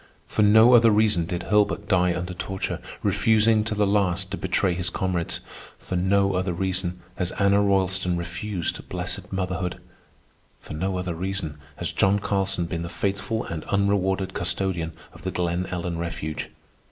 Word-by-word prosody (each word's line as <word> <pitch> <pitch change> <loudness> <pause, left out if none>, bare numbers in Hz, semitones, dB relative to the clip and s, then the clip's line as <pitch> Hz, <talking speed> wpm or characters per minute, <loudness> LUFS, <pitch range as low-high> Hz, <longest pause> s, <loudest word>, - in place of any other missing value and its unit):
For - - -1
no 110 +4 +7
other 115 -1 +7
reason 105 -6 +3
did 85 0 -3
Hurlbert 105 -1 +2
die 90 -3 +3
under 90 +1 -4
torture, 95 +2 -3 0.2
refusing 110 0 +3
to 110 - -2
the 105 0 +2
last 95 -2 +1
to - - -1
betray 95 0 +1
his 90 0 -1
comrades. 90 -3 -2 0.4
For - - -5
no 100 +2 +2
other 90 0 0
reason 90 0 -2 0.2
has 90 0 -1
Anna 100 0 +3
Roylston 95 -2 +1
refused 90 +1 -4
blessed 90 0 -4
motherhood. 95 -1 -2 0.8
For - - -10
no 95 +4 -1
other 90 -1 -2
reason 85 -3 -4 0.2
has - - -3
John 95 +1 +3
Carlson 95 -3 0
been 85 0 -3
the 85 - -4
faithful 100 +5 -2
and 80 -2 -5
unrewarded 95 -1 +1
custodian 85 -2 -1 0.2
of - - -14
the 95 - -3
Glen 90 0 -1
Ellen 85 -2 -3
Refuge. 80 -2 -4
95 Hz, 160 wpm, -25 LUFS, 90-100 Hz, 0.8 s, no